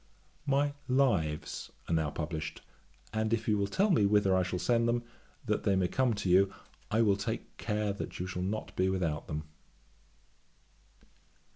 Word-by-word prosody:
'My 140 +1 +2
Lives 100 - +1 0.2
are - - -1
now 80 -2 +2
published; 80 +1 -4 0.5
and 110 0 0
if 115 - 0
you 105 - +4
will 100 -1 +1
tell 195 - +2
me 105 - +4
whither 100 -2 +4
I 95 - +4
shall 90 0 -2
send 115 +4 +2
them, 120 0 +1 0.4
that - - 0
they 100 - +2
may 95 -1 +2
come 125 +4 +1
to 105 -1 -3
you, 95 +2 +5 0.4
I 115 +2 +3
will 100 -3 +4
take 105 +3 -4
care 105 -2 -1
that 100 - -6
you 90 - -2
shall 90 0 -4
not 100 +4 -3
be 95 0 +2
without 85 -5 -1
them. 75 0 -3
100 Hz, 170 wpm, -31 LUFS, 90-115 Hz, 0.5 s, you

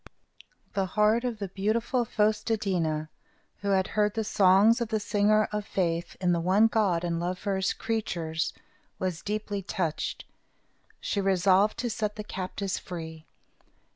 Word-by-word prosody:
The 195 -2 0
heart 215 +3 +4
of 245 -3 -2
the 200 -2 -5
beautiful 220 +6 0
Fos 215 -1 +1
te 225 - +1
dí 195 -4 0
na, 155 -1 -1 0.5
who 200 - -6
had 190 -1 +2
heard 210 0 +1
the 220 - 0
songs 205 +3 +4
of 235 - 0
the 220 0 -1
singer 210 +1 +2
of 210 0 -2
faith 170 -4 -2
in 180 -1 +2
the 170 - +2
one 190 +6 +4
God 205 -7 +2
and 170 -1 -1
love 180 +2 -2
for 200 +1 -2
his 190 0 +1
creatures, 170 -8 -2 0.5
was 185 -3 -3
deeply 210 -1 -3
touched. 180 -5 -3 0.7
She 200 - -1
resolved 195 +1 +3
to 240 - -2
set 210 -1 -2
the 210 - -5
captives 190 -1 -4
free. 160 -3 -8
200 Hz, 165 wpm, -28 LUFS, 180-215 Hz, 0.7 s, heart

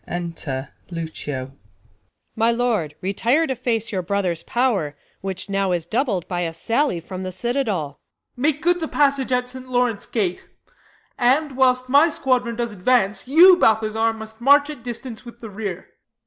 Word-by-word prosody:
Enter 165 -6 -4 0.2
Lucio. 160 -5 -5
Luc. 130 - -11 0.8
My 225 +1 +3
lord, 230 -11 0
retire 235 - +1
to 265 -4 -2
face 230 -2 -2
your 190 -3 -1
brother's 180 -2 -1
pow'r, 210 - 0 0.2
Which 190 -1 -5
now 195 -2 0
is 170 -2 -2
doubled 215 - -1
by 175 - -2
a 165 -2 -2
sally 230 - 0
from 185 +3 -7
The 185 0 -4
citadel. 200 - -2 0.4
Ben. 245 - -10
Make 300 +1 +1
good 350 +1 +3
the 320 - -2
passage 275 -3 +1
at 250 0 +1
Saint 255 0 -9
Laurence 245 -4 0
Gate: 195 -6 -2 0.7
And, 270 +3 +2
whilst 255 -1 +3
my 285 +6 +5
squadron 250 -5 0
does 235 0 -2
advance, 205 +1 +1
You, 350 +6 +8
Balthazar, 220 -2 +2
must 220 0 -10
march 285 +3 +5
at 280 -6 -11
distance 240 -1 -6
with 235 -1 -12
The 225 -3 -9
rear. 195 -3 -5
225 Hz, 165 wpm, -22 LUFS, 185-255 Hz, 0.8 s, You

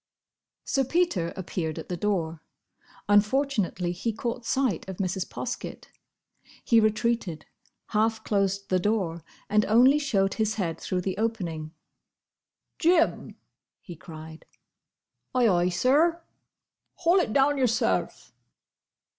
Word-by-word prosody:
Sir 270 - +1
Peter 265 - 0
appeared 170 -4 -3
at - - -7
the 180 - -3
door. 170 -5 -2 0.7
Unfortunately 205 -4 +2
he 180 +6 -2
caught 230 +1 -4
sight 250 -10 0
of 190 - -6
Mrs. 185 -1 -2
Poskett. - - -6 0.7
He 230 - +4
retreated, 215 -7 0 0.4
half 220 0 +1
closed 200 -1 0
the 185 - +2
door, 180 -4 -1 0.3
and 210 +1 +3
only 255 +7 +5
showed 195 -9 +1
his 220 -1 0
head 170 -6 -2
through 180 -1 -2
the 190 +2 -3
opening. 170 -8 -3 1.0
"Jim!" 340 0 +2 0.4
he 175 - -10
cried. 160 0 -11 0.9
"Ay, 250 -2 +4
ay, 180 -3 +3
sir!" 305 - +2 0.7
"Haul 350 +2 +3
it 350 - 0
down 280 +3 +3
yourself." 245 -3 0
210 Hz, 115 wpm, -26 LUFS, 180-245 Hz, 1.0 s, only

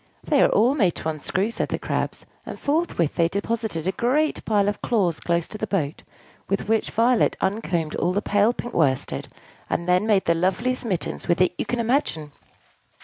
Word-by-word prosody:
"They 290 -3 +3
are - - +5
all 235 +6 +4
made 200 - +2
to 160 - -3
unscrew," 185 +7 -1
said - - -2
the - - -1
Crabs; - - -3 0.2
and - - -7
forthwith 285 - 0
they 165 - +2
deposited 200 -2 -2
a - - +2
great 285 +9 0
pile 205 -2 +2
of 205 0 -2
claws 185 -9 +1
close 170 -1 0
to 215 - -7
the 220 - -2
boat, 160 -7 -2 0.5
with 195 +1 -1
which 225 0 +1
Violet 235 +2 +2
uncombed 185 -6 -1
all 175 - 0
the 195 - +1
pale 205 +2 +2
pink 240 0 -7
worsted, 135 -5 0 0.4
and 170 - -1
then 180 +4 +3
made 205 -3 +3
the 170 - +4
loveliest 190 +10 0
mittens 185 -8 -3
with 175 - +2
it 185 -1 +3
you - - -4
can 245 - -1
imagine. 230 - 0
200 Hz, 195 wpm, -24 LUFS, 170-230 Hz, 0.5 s, are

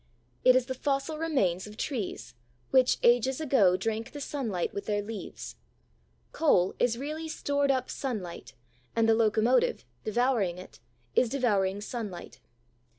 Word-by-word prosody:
It 255 - +7
is 255 -1 +3
the 260 - -3
fossil 280 +3 -2
remains 210 - 0
of 210 0 -12
trees 215 - -4 0.4
which, 255 -1 +4
ages 245 +3 +4
ago, 220 - +4
drank 225 +3 -3
the 290 - -6
sunlight 240 -11 -3
with 200 - -5
their 205 -1 0
leaves. 215 -1 -7 0.7
Coal 190 - +3
is 235 -1 +2
really 305 +4 -5
stored 285 -2 0
up 260 -2 +1
sunlight 180 - -5 0.4
and 230 -1 +3
the 225 - +5
locomotive, 225 - +2 0.2
devouring 220 -5 +1
it, 185 - -12 0.4
is 245 - +4
devouring 205 -7 +1
sunlight. 210 - -6
230 Hz, 140 wpm, -29 LUFS, 200-270 Hz, 0.7 s, It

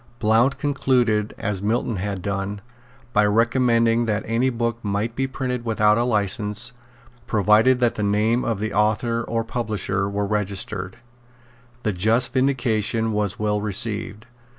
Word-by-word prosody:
Blount 120 +4 +2
concluded, 125 -7 +1
as 100 -2 -3
Milton 110 +1 -1
had 95 -1 -4
done, 100 0 -3 0.5
by 105 - +4
recommending 115 +1 +2
that 105 0 -1
any 115 +4 +1
book 115 -1 -2
might 105 +3 -2
be 135 +1 -1
printed 125 -2 -3
without 105 -2 +3
a 120 - +1
license, 105 +1 +1 0.5
provided 110 +4 +4
that 120 -2 +2
the - - -5
name 105 +4 +1
of 115 -3 -1
the 110 +1 -3
author 110 +2 +1
or 115 -1 -2
publisher 105 -4 -2
were 100 0 -2
registered. 100 -2 -3 0.9
The 110 - +1
Just 110 +7 +2
Vindication 115 -4 0
was 105 -2 -1
well 105 -1 -1
received. 105 0 -2
110 Hz, 140 wpm, -22 LUFS, 105-120 Hz, 0.9 s, by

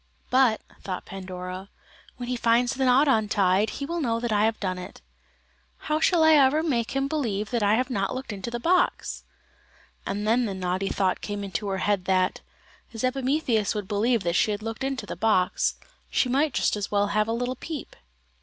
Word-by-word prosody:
"But," 255 -4 +4 0.2
thought 185 -2 -5
Pandora; 185 0 -7 0.5
"when 245 - -6
he 250 - -1
finds 240 +1 +2
the 265 0 0
knot 260 +4 +5
untied 205 -4 +2
he 280 - -5
will 340 +3 -3
know 230 -4 0
that 240 -1 -2
I 210 0 +3
have 225 0 0
done 185 -2 -2
it; 180 - -9 0.8
how 305 +1 -1
shall 330 0 +3
I 315 0 +7
ever 295 +1 +5
make 240 -7 -1
him 270 0 +1
believe 225 -9 -2
that 240 -2 0
I 205 +1 +4
have 255 +3 -1
not 195 -2 -1
looked 260 -4 -5
into 195 +2 -5
the 240 0 -4
box?" 355 +8 +1 0.8
And 205 +2 -3
then 240 +2 +3
the 200 -3 -3
naughty 185 +1 -1
thought 190 -2 0
came 205 -1 -4
into 200 +1 -4
her 195 -1 -1
head 195 -1 0
that, 185 -1 +1 0.5
as 225 - -4
Epimetheus 255 -4 +1
would 205 -2 -3
believe 215 +2 +1
that 170 - 0
she 215 - +3
had 210 0 -3
looked 225 +3 -4
into 270 -5 -2
the - - -6
box, 190 -3 +1 0.3
she - - +1
might 280 +2 +1
just - - +2
as 205 -2 -3
well 205 0 +1
have 215 +1 +1
a - - -1
little 245 +2 -2
peep. 300 +2 -7
225 Hz, 200 wpm, -26 LUFS, 200-260 Hz, 0.8 s, I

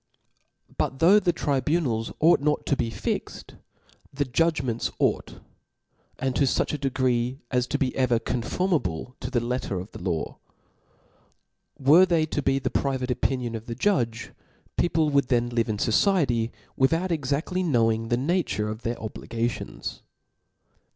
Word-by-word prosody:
But 135 - 0
though 185 +8 +6
the 180 -3 +2
tribunals 140 -6 0
ought 165 +3 +5
not 150 +1 0
to 140 - +1
be 120 -3 -1
fixt, - - -4 0.6
the 145 +1 -1
judgments 130 -3 0
ought; - - -1 0.8
and 130 -1 -2
to 140 - +4
fuch 130 - 0
a 150 - -2
degree 130 -2 0
as 125 -1 +1
to - - -1
be 130 -3 -1
ever 125 -3 +2
conformable 125 - -2
to 125 - -5
the 130 -3 +1
letter 120 -5 -2
of 95 +4 -8
the - - -10
law. 85 -4 -3 1.4
Were 155 +8 +6
they 165 -3 +2
to 150 -1 -2
be 135 0 +2
the 135 -1 -2
private 130 -2 -1
opinion 125 -2 -1
of 115 +1 -6
the 115 - -4
judge, 120 - 0 0.4
peo 175 - +2
ple 160 -3 +2
would 140 -2 +2
then 120 -2 +1
live 115 -1 0
in 105 - -1
fociety, 120 - +2 0.3
without 165 +7 +2
exadly 150 +4 -1
knowingthe 115 -6 +1
nature 135 - 0
of 110 +1 -6
their 120 0 -3
obligations. 115 +2 -4
130 Hz, 150 wpm, -26 LUFS, 115-150 Hz, 1.4 s, though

